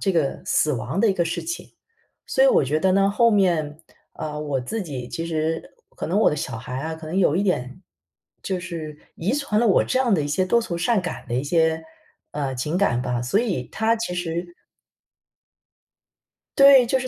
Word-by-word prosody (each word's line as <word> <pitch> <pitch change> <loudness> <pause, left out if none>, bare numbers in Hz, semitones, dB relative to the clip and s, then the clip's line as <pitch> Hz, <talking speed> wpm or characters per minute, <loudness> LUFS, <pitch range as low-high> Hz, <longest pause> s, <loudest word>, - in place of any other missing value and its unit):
这 195 - +1
个 155 -5 0
死 150 - +2
亡 135 +8 -2
的 220 -2 +4
一 - - +2
个 175 -2 0
事 165 - -3
情。 345 - -5 0.6
所 - - +3
以 - - +7
我 475 -1 +5
觉 155 - 0
得 185 +2 +2
呢， 195 +1 +3
后 235 +3 +4
面 170 -7 +1 0.4
呃， 150 -1 -5
我 145 -3 -2
自 220 - -4
己 130 -7 -6
其 165 - -4
实 160 0 -2 0.2
可 - - -4
能 185 +6 +1
我 - - +5
的 150 - -2
小 120 -4 -4
孩 125 +3 -6
啊， 160 +3 -4
可 160 0 -10
能 180 - -3
有 170 -5 +3
一 190 - +1
点 180 -3 -2 0.6
就 185 -2 -3
是 160 -4 -6 0.2
遗 195 +8 -1
传 255 -7 0
了 240 - +3
我 195 - +4
这 255 - 0
样 245 -5 +3
的 155 - +1
一 145 - -3
些 185 +6 +1
多 235 +4 +3
愁 170 -5 -4
善 220 +4 +2
感 180 - -6
的 120 - -4
一 130 - 0
些， 160 +1 +1 0.5
呃， 140 -3 -3
情 150 +8 -2
感 125 -11 +1
吧， 125 -2 -2
所 125 - +1
以 185 - -2
他 225 +1 +1
其 220 -5 -3
实 175 0 -4 2.0
对， 275 -2 +8
就 260 +2 +1
是 255 - -4
170 Hz, 230 characters per minute, -23 LUFS, 150-205 Hz, 2.0 s, 对